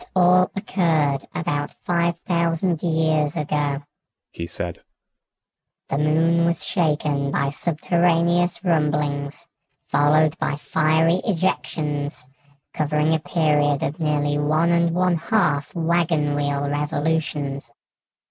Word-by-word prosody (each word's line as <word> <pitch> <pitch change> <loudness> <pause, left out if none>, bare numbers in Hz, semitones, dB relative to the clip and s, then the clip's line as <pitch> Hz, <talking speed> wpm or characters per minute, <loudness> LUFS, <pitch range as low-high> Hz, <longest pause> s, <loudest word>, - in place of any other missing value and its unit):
"It - - -16
all 180 0 +5
occurred 160 -8 0
about 145 -4 -2
five 170 -1 0
thousand 170 -1 0
years 160 -2 +1
ago," 145 -2 -1 0.5
he 85 - -6
said. 85 0 -5 1.1
"The 135 - -1
Moon 165 +3 +2
was 170 0 0
shaken 150 -5 0
by 140 0 0
subterraneous 170 +3 +1
rumblings, 150 -2 -1 0.4
followed 155 +1 +3
by - - -1
fiery 160 +4 +1
ejections, 150 - -2 0.5
covering 150 +1 +1
a 160 - +1
period 150 -2 +1
of 150 - -3
nearly 145 -2 0
one 155 +3 +2
and 170 0 +2
one 180 -1 +2
half 160 -5 0
wagon 165 -3 +1
wheel 145 0 -1
revolutions. 145 -2 -2
155 Hz, 110 wpm, -22 LUFS, 145-170 Hz, 1.1 s, all